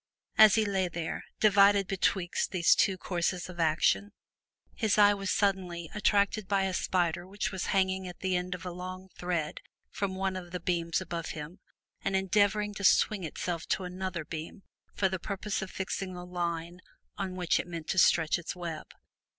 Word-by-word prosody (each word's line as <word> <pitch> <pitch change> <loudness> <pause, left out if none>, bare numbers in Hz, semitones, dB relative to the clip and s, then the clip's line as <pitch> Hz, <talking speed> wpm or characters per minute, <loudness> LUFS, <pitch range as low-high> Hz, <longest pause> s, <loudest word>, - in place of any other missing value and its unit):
As 215 -2 +8
he 220 -1 +3
lay 190 -2 +1
there, 170 -1 -4
divided 200 -1 +5
betwixt 185 -1 0
these 180 -4 +4
two 190 -1 +2
courses 180 0 -2
of 175 -1 -10
action, 165 +5 +2 0.6
his 220 -3 +1
eye 205 -1 +7
was 195 -1 -4
suddenly 185 -5 0
attracted 205 -1 +2
by 195 -1 +2
a 190 -1 -1
spider 175 -1 0
which 200 +1 -3
was 190 -2 -3
hanging 190 -1 +1
at 180 - -10
the 185 -1 0
end 180 0 -2
of 180 - -10
a 180 - -3
long 185 +1 -7
thread 175 -4 -3 0.3
from 195 -2 -2
one 190 0 -1
of 180 -1 -6
the 180 +1 -4
beams 170 0 0
above 170 -3 -4
him 155 +5 -8 0.4
and 195 - 0
endeavoring 205 +2 +2
to 205 - -7
swing 200 0 +4
itself 170 +1 -4
to 190 - 0
another 180 -2 -4
beam 165 +6 -7 0.3
for 195 - +2
the 190 -1 -3
purpose 200 +2 -3
of 190 - -5
fixing 190 0 -4
the 180 0 -7
line 175 0 -3 0.4
on 190 -2 -3
which 180 -2 +1
it - - -4
meant 165 -2 -6
to 190 - +2
stretch 160 -1 +4
its 170 - -6
web. 170 -3 -6
185 Hz, 185 wpm, -30 LUFS, 175-195 Hz, 0.6 s, As